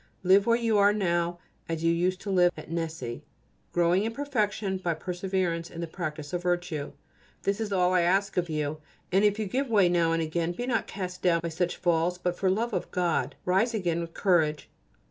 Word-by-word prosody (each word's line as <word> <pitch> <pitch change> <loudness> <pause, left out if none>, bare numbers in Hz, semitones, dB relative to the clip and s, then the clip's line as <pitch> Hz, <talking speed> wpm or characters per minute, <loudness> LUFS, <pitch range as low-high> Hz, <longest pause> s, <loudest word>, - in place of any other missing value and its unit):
Live 195 +3 +5
where 230 0 +4
you 230 -2 0 0.2
now 175 -4 +1
are - - -21 0.3
as 165 0 -2
you 165 0 +3
used 180 +2 0
to 200 - -4
live 180 -2 +4
at - - -9
Nessy, 160 -8 -4 0.5
growing 175 +3 +3
in 225 - -1
perfection 215 -8 -1
by 170 -3 -1
perseverance 180 -1 -2
in 165 - -9
the 170 - -2
practice 155 -2 -6
of 175 - -1
virtue. 175 -5 -2 0.5
This 200 +2 0
is 215 -2 -3
all 180 -1 +2
I 180 - +4
ask 195 +3 +1
of 175 -1 0
you. 150 0 -2 0.3
And 195 +3 +3
if 205 0 +3
you 220 - -1
give 260 +7 -1
way 200 -5 +4
now 170 -2 +2
and 165 - +1
again, 165 +2 -1
be 240 +8 -4
not 250 -2 0
cast 180 -2 -5
down 170 -2 +3
by 170 - -3
such 175 +2 -1
falls, 175 0 +1
but 180 0 -2
for 190 - +1
love 225 +5 0
of 180 - -2
God 175 -2 0
rise 200 +6 +2
again 170 -5 0
with 165 0 -7
courage. 160 -6 +1
180 Hz, 210 wpm, -28 LUFS, 170-195 Hz, 0.5 s, Live